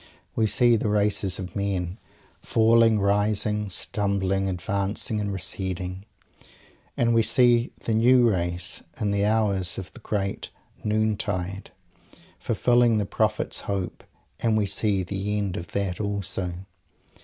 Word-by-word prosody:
We 110 - +2
see 120 +2 +4
the 105 - -1
races 105 -3 +1
of 95 -2 -7
men, 95 -1 -2 0.4
falling, 115 -1 +4
rising, 105 +1 +1
stumbling, 95 0 0
advancing 100 +4 -1
and 100 -1 -2
receding 95 0 -4 0.9
and 120 -1 +2
we 115 - +5
see 120 +1 +3
the 115 - 0
new 120 +2 +5
race 90 -2 -1 0.2
in 105 -3 0
the 100 0 +1
hours 100 -5 +1
of 95 -1 -7
the - - -12
"Great 100 -3 -3 0.3
Noon 110 0 +1
tide" 95 -1 -4 0.7
fulfilling 120 -2 +3
its 100 - -3
Prophet's 110 -1 0
hope 95 -4 -4 0.4
and 110 -2 +2
we 105 - +2
see 100 -1 +1
_the 100 +3 -2
end 100 -3 -2
of 85 -4 -5
that 100 -3 -1
also! 100 -3 -2
100 Hz, 130 wpm, -25 LUFS, 95-110 Hz, 0.9 s, we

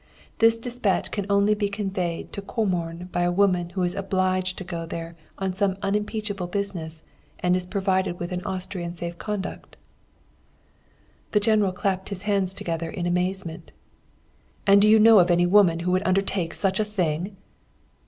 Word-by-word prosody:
This 230 0 +5
despatch 235 -4 -1
can 200 -2 -3
only 200 +1 +4
be 205 -1 -1
conveyed 190 -4 -3
to 200 - -4
Comorn 180 -5 -2
by 175 - 0
a 175 0 +2
woman 180 -2 +2
who 185 +1 -2
is 175 0 +1
obliged 185 -1 0
to - - -5
go 170 -2 -5
there 165 0 -6 0.2
on 190 -1 -2
some 190 0 0
unimpeachable 210 -1 -2
business, 175 -5 -4 0.4
and 180 0 +3
is 180 -1 -2
provided 190 -2 0
with 175 +1 -4
an 180 0 -3
Austrian 185 -2 -4
safe 170 0 -6
conduct.' 210 -2 -5 1.6
"The 210 - +5
General 210 -2 +3
clapped 190 0 -2
his 200 -2 -5
hands 195 -3 0
together 165 -2 -3
in 175 +1 -4
amazement. 180 -1 -2 0.9
"'And 200 0 +6
do 210 - +5
you 220 - +7
know 220 -1 +8
of 180 0 +4
any 175 0 +4
woman 175 -3 +4
who 180 +1 0
would 185 0 +2
undertake 185 -3 0
such 190 0 +1
a - - +3
thing?' 190 -2 -2
190 Hz, 165 wpm, -25 LUFS, 175-200 Hz, 1.6 s, know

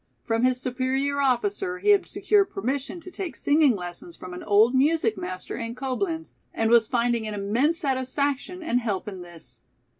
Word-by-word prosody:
From 225 0 0
his 255 0 +3
superior 265 +2 -1
officer 360 +8 +1
he 405 +3 -1
had 405 -2 +5
secured 400 +1 +2
permission 280 -2 -3
to 365 - -10
take 365 -2 -5
singing 290 -4 +3
lessons 180 - -7
from 185 -1 -9
an 180 - -7
old 215 +4 +4
music 270 -4 +2
master 185 -2 -5
in 230 0 -5
Coblenz, 320 +6 -3 0.2
and 225 0 +1
was 235 -2 +6
finding 235 -2 0
an 210 - -4
immense 235 +11 +1
satisfaction 280 +5 -1
and 245 -6 +1
help 210 -6 -3
in 190 -3 -6
this. 160 -9 -12
255 Hz, 175 wpm, -25 LUFS, 225-320 Hz, 0.2 s, was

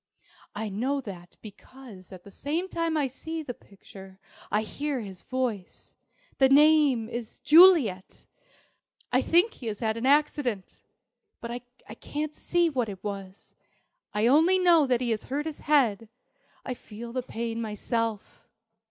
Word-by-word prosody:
I 215 +1 -3
know 255 +8 -1
that, 180 -7 -10
because 215 -2 -13
at 185 -2 -11
the 200 - -14
same 315 - -3
time 330 -3 -2
I 295 - +1
see 320 +5 -5
the 250 - -6
picture 195 -2 -15 0.3
I 210 +1 +1
hear 285 +4 -3
his 195 -5 -9
voice. 245 -8 -5 0.4
The 265 -1 +5
name 290 -5 +5
is 235 -1 -7
'Juliet!' 305 - +5 0.9
I - - +3
think 355 +7 +3
he 240 - -9
has 210 -2 -4
had 220 -1 -1
an 235 +3 -1
accident. 280 -8 0 0.6
But 235 - -7
I 245 -2 -10
can't 300 +6 -5
see 345 -1 +1
what 255 -8 -1
it 195 -2 -9
was, 195 -2 -7 0.6
I 210 +2 0
only 320 +9 +5
know 340 -5 +4
that 250 -1 +1
he 240 -2 -1
has 220 - -2
hurt 290 +3 -3
his 315 -2 -6
head. 230 -8 +1 0.6
I 255 - -3
feel 235 0 -10
the 255 - -1
pain 230 -1 -5
myself. 225 0 -4
245 Hz, 150 wpm, -27 LUFS, 215-295 Hz, 0.9 s, The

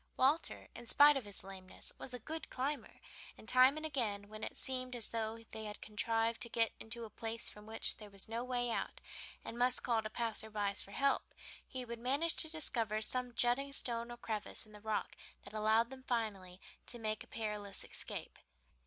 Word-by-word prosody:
Walter, 280 +6 +2
in 240 0 -9
spite 290 +3 +8
of 265 -5 -1
his 205 -1 -3
lameness, 190 -1 -6
was 260 - -3
a 250 - -1
good 315 +7 -6
climber, 275 +3 -2 0.4
and 220 - -13
time 255 +4 +7
and 310 - -3
again, 210 -9 -1
when 215 0 -8
it - - -4
seemed 255 -1 -1
as 235 -3 -2
though 225 0 -2
they 220 0 -5
had 210 0 -5
contrived 225 +2 0
to 235 - 0
get 230 0 +3
into 235 +1 -4
a - - -9
place 230 0 -3
from 210 0 -9
which 220 0 +3
there 210 -1 -10
was 195 +1 -4
no 230 +2 -2
way 245 -1 0
out, - - -2 0.5
and 235 - -5
must 250 +1 +3
call 235 -3 +3
to 215 - -4
passers 220 -1 -2
by 205 -1 +1
for 195 - +1
help, 275 +7 +1 0.3
he 255 -1 -5
would 235 -1 -5
manage 280 +7 +3
to 315 - +6
discover 235 -9 0
some 250 +2 +1
jutting 245 +4 +3
stone 235 -3 +3
or 240 - -6
crevice 220 -3 -1
in 215 - -17
the 210 -1 -12
rock 215 -1 -1 0.3
that 200 - -10
allowed 220 +3 +3
them 265 -1 -8
finally 205 -7 -2 0.3
to 240 - -3
make 215 -2 -1
a - - -17
perilous 210 -3 -3
escape. - - -6
230 Hz, 205 wpm, -37 LUFS, 215-255 Hz, 0.5 s, spite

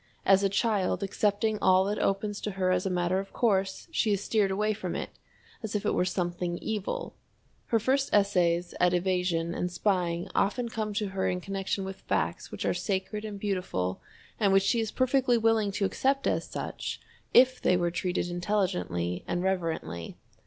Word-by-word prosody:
As 195 0 +6
a 200 - +2
child 200 -1 +1
accepting 210 +2 0
all 185 0 +5
that 205 +1 -1
opens 200 +1 -1
to 210 - -3
her 185 -1 +2
as 185 +1 +1
a - - 0
matter 180 +1 +1
of 195 0 -6
course, 195 - 0
she 225 -9 +1
is 200 0 -1
steered 210 -3 +2
away 210 +3 +1
from 185 -4 -4
it - - -4 0.5
as 220 -3 -5
if 210 - -1
it - - +2
were 180 - +2
something 175 -1 -2
evil. 220 - -3 0.5
Her 230 - +3
first 270 +5 +1
essays 180 -4 +2
at 180 0 +4
evasion 175 -2 0
and 180 0 -2
spying 175 -3 0
often 235 +4 +1
come 215 -2 -3
to 205 -1 -1
her 190 0 -1
in 180 - -1
connection 195 +1 -3
with 190 0 -6
facts - - -2
which - - -4
are - - +2
sacred 205 +1 -2
and 210 -2 -6
beautiful 180 - -2 0.4
and 205 -3 +3
which 195 0 +5
she 230 +4 +2
is 220 -1 -1
perfectly 255 -1 +2
willing 225 -2 +2
to 200 - 0
accept 275 +7 0
as - - +1
such - - -5 0.3
if 255 +1 +5
they 180 - +3
were 175 -1 0
treated 175 +1 -1
intelligently 175 - -1
and 175 - -1
reverently. 165 - -2
195 Hz, 185 wpm, -28 LUFS, 180-210 Hz, 0.5 s, As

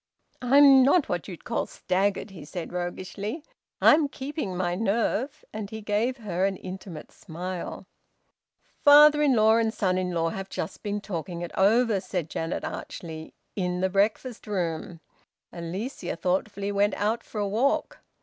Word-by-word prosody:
"I'm 270 +1 +7
not 285 +5 +4
what 175 -2 -2
you'd 180 -4 -9
call 235 - -2
staggered," 195 +2 -1
he 170 -6 -10
said 170 +4 -7
roguishly. 190 - -4 0.4
"I'm 300 -1 +6
keeping 270 - -5
my 175 -1 0
nerve." 225 +8 -1
And 215 -2 -5
he 220 0 -7
gave 215 +5 0
her 190 -6 -2
an 195 -1 -1
intimate 185 -4 -8
smile. 180 +2 -6 1.0
"Father 295 0 +8
in 280 -4 +4
law 220 0 +5
and 225 -1 +1
son 185 -4 0
in 185 -1 -1
law 165 -1 0
have 195 +3 -6
just - - -5
been 205 -1 -3
talking 175 -3 -5
it 175 - -6
over," 220 +2 +3
said 180 -4 -4
Janet 165 +1 -3
archly, 160 -2 -7 0.2
"in 180 -2 -1
the 190 - +2
breakfast 215 +5 0
room! 170 -4 -3 0.5
Alicia 180 +4 -5
thoughtfully 195 +4 -1
went 205 0 +2
out 220 +3 0
for 215 - -7
a 205 - 0
walk. 235 +8 0
200 Hz, 155 wpm, -26 LUFS, 180-230 Hz, 1.0 s, Father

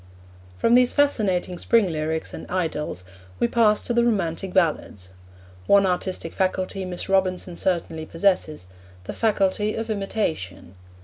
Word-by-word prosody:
From 230 - +2
these 250 0 +5
fascinating 195 - +1
spring 225 -6 +2
lyrics 160 0 -3
and - - -8
idylls 160 - -2 0.3
we 120 - +2
pass 215 - +2
to 240 - -1
the 235 0 +3
romantic 195 -5 -1
ballads. 155 - 0 0.6
One 200 -1 +5
artistic 180 -2 -2
faculty 190 0 -1
Miss 180 -1 -6
Robinson 185 -2 0
certainly 165 -3 -2
possesses 165 - 0 0.4
the - - -6
faculty 210 -1 +1
of 225 0 -3
imitation. 165 - -3
185 Hz, 130 wpm, -23 LUFS, 165-210 Hz, 0.6 s, these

